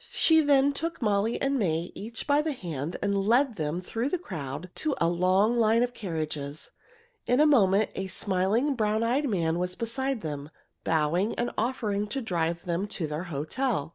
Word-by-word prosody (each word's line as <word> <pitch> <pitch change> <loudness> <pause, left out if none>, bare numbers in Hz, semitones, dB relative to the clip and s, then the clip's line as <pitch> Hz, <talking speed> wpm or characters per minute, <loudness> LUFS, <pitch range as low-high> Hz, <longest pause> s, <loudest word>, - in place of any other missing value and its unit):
She 320 -1 +5
then 285 -1 +4
took 330 +4 -2
Molly 210 0 +1
and 275 0 0
May 170 -4 -1
each 225 +2 -5
by 290 0 +3
the 310 -1 -2
hand 165 - -5
and 200 0 +1
led 240 +3 +2
them 155 +1 -2
through 225 +8 -3
the 365 - 0
crowd 160 - -6
to 305 -3 0
a 165 - +2
long 185 +6 +2
line 230 0 +4
of 245 0 -2
carriages. 155 -7 -4 0.6
In 250 +2 +3
a 305 - +6
moment 210 -8 +4
a 190 - -4
smiling, 195 +9 0
brown 215 -2 0
eyed 265 +5 +1
man 170 -4 0
was 180 0 -2
beside 265 +2 -2
them, 145 -2 -5 0.3
bowing 165 +6 +1
and 240 - -1
offering 215 -4 -1
to 270 +6 -3
drive 170 -7 -2
them 175 +3 -1
to 180 -4 -3
their 155 +3 -4
hotel. 160 - -2
205 Hz, 180 wpm, -27 LUFS, 170-245 Hz, 0.6 s, a